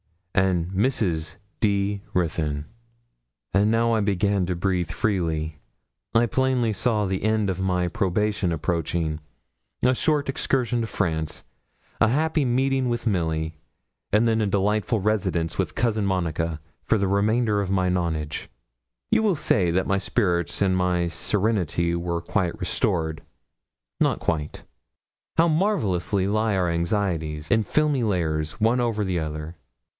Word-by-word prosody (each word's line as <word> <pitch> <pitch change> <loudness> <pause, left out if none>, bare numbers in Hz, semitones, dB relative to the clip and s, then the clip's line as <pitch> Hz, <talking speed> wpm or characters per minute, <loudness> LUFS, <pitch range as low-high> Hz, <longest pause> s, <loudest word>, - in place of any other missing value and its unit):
and 90 -3 +2
Mrs. 95 -7 0 0.2
D. 100 -1 +1
Ruthyn.' 75 -4 -1 0.9
And 100 +1 +4
now 115 +1 +2
I 110 - +2
began 100 -2 +1
to 90 - -1
breathe 90 -1 0
freely, 80 -7 -1 0.6
I 115 +1 +5
plainly 125 -2 +1
saw 105 -1 +1
the 95 0 -2
end 110 -2 +1
of 95 - -5
my 90 -1 +1
probation 105 -1 0
approaching: 80 -1 -1 0.7
a 130 - +5
short 150 +2 +1
excursion 125 -3 0
to 115 - -2
France, 80 -6 -2 0.6
a - - +5
happy 155 +4 +1
meeting 130 +1 +1
with 120 0 -2
Milly, 80 -6 -1 0.5
and 110 +3 +4
then 110 -1 +2
a 105 - +1
delightful 105 +3 +1
residence 95 -5 0
with - - -1
Cousin 110 -3 +1
Monica 85 -3 -1 0.3
for 115 - +3
the 100 -2 0
remainder 105 +1 +2
of 100 - -3
my 95 -1 +1
nonage. 80 -4 -2 0.6
You 220 0 +4
will 210 -4 +2
say 105 - +2
then 85 0 0
that 95 - +1
my 95 0 +2
spirits 90 -3 0
and 95 -1 +2
my 90 -2 +1
serenity 90 -4 0
were 85 0 -2
quite 85 +1 -1
restored. 80 -2 -1 0.8
Not - - +2
quite. 75 -2 -2 0.7
How 165 +1 +5
marvellously 110 - +1
lie 110 +1 +1
our 90 -2 +1
anxieties, 85 -3 -1
in 115 -2 +4
filmy 150 +3 +1
layers, 80 -8 0
one 115 +3 +2
over 115 -3 0
the 90 -3 -1
other! 75 +1 -5
95 Hz, 140 wpm, -24 LUFS, 85-110 Hz, 0.9 s, I